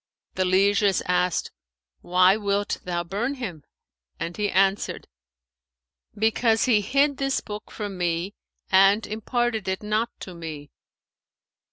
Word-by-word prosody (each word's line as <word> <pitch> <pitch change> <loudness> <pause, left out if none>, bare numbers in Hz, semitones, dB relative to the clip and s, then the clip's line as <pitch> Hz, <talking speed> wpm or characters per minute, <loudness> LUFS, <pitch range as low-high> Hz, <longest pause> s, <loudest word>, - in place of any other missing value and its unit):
The 185 - 0
lieges 200 +1 +3
asked, 180 0 0 0.5
'Why 185 +2 +4
wilt 205 -1 -1
thou 175 -1 -2
burn 215 +11 -2
him?'; 185 - -6 0.6
and 170 - -4
he 210 -1 -1
answered, 195 +2 +1 1.1
'Because 225 +1 +2
he 225 -5 +4
hid 275 +6 +2
this 275 -1 0
book 210 0 -8
from 205 -3 -6
me 175 +2 -1 0.4
and 195 +3 +5
imparted 225 0 -2
it 190 +2 -2
not 215 +3 0
to 185 - -7
me.' 155 -4 -8
200 Hz, 125 wpm, -25 LUFS, 180-220 Hz, 1.1 s, and